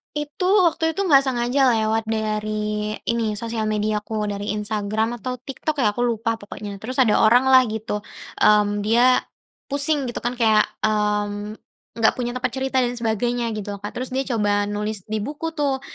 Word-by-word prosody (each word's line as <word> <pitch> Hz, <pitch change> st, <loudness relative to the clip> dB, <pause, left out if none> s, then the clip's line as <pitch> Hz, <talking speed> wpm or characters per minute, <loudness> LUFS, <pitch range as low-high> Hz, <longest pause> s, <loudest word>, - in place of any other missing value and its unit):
Itu, 295 Hz, +4 st, -4 dB, 0.2 s
waktu 325 Hz, 0 st, 0 dB
itu 395 Hz, +3 st, -2 dB
nggak 275 Hz, -4 st, +6 dB
sengaja 255 Hz, +1 st, +2 dB
lewat 220 Hz, 0 st, +1 dB
dari 215 Hz, -1 st, -2 dB, 0.2 s
ini, 230 Hz, -1 st, 0 dB
sosial 230 Hz, -1 st, -3 dB
mediaku, 215 Hz, 0 st, -1 dB
dari 205 Hz, 0 st, -3 dB
Instagram 215 Hz, +2 st, -2 dB
atau 250 Hz, +2 st, -5 dB
TikTok 280 Hz, +4 st, -4 dB
ya, 210 Hz, -5 st, +2 dB
aku 245 Hz, -, 0 dB
lupa 230 Hz, -1 st, 0 dB
pokoknya. 205 Hz, -1 st, -8 dB
Terus 255 Hz, +4 st, -4 dB
ada 235 Hz, -5 st, +4 dB
oranglah 255 Hz, +3 st, +6 dB
gitu, 215 Hz, -1 st, -4 dB, 0.4 s
mmm, 205 Hz, -1 st, +4 dB
dia 240 Hz, +4 st, +4 dB, 0.5 s
pusing 285 Hz, +1 st, +1 dB
gitu -, -, -5 dB
kan, 240 Hz, +1 st, -3 dB
kayak, 220 Hz, -3 st, +3 dB, 0.2 s
mmm, 210 Hz, 0 st, 0 dB, 0.4 s
enggak 225 Hz, -1 st, +3 dB
punya 240 Hz, 0 st, -2 dB
tempat 255 Hz, 0 st, -1 dB
cerita 265 Hz, 0 st, 0 dB
dan 245 Hz, -, 0 dB
sebagainya 235 Hz, +1 st, -1 dB
gitu 205 Hz, -1 st, -5 dB
kan. 205 Hz, -, -5 dB
Terus 255 Hz, +1 st, -4 dB
dia 265 Hz, +1 st, 0 dB
coba 205 Hz, -1 st, +1 dB
nulis 210 Hz, +1 st, -2 dB
di 215 Hz, -1 st, -2 dB
buku 305 Hz, +6 st, -5 dB
tuh. 280 Hz, -3 st, 0 dB
225 Hz, 165 wpm, -22 LUFS, 210-255 Hz, 0.5 s, nggak